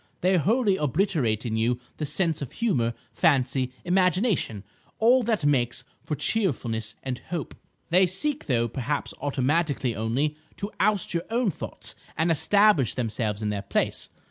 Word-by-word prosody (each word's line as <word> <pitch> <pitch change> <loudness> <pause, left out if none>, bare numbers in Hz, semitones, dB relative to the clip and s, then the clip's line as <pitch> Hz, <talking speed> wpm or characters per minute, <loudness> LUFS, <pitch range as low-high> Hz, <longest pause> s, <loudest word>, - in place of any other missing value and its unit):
They 185 +1 +3
wholly 205 - +2
obliterate 145 - +1
in 110 -2 -1
you 120 +2 +1 0.2
the 150 - -2
sense 160 +1 0
of 140 - -6
humour, 125 - 0 0.2
fancy, 130 -1 +2
imagination,—all 185 - +1
that 220 -9 0
makes 125 -4 +1 0.2
for 150 - -3
cheerfulness 120 - -1
and 130 -1 -3
hope. 170 -4 -4 0.4
They 185 +2 +5
seek, 280 - -1
though 120 -4 +2
perhaps 140 +4 -3
automatically 140 -2 0
only, 130 +8 -1 0.2
to 200 +1 -4
oust 205 -2 +1
your 170 0 -1
own 230 -2 +1
thoughts - - -5 0.2
and 160 +2 +2
establish 200 - +4
themselves 110 -3 -2
in 105 - 0
their 100 -1 -2
place. 100 - -1
150 Hz, 145 wpm, -26 LUFS, 120-190 Hz, 0.4 s, They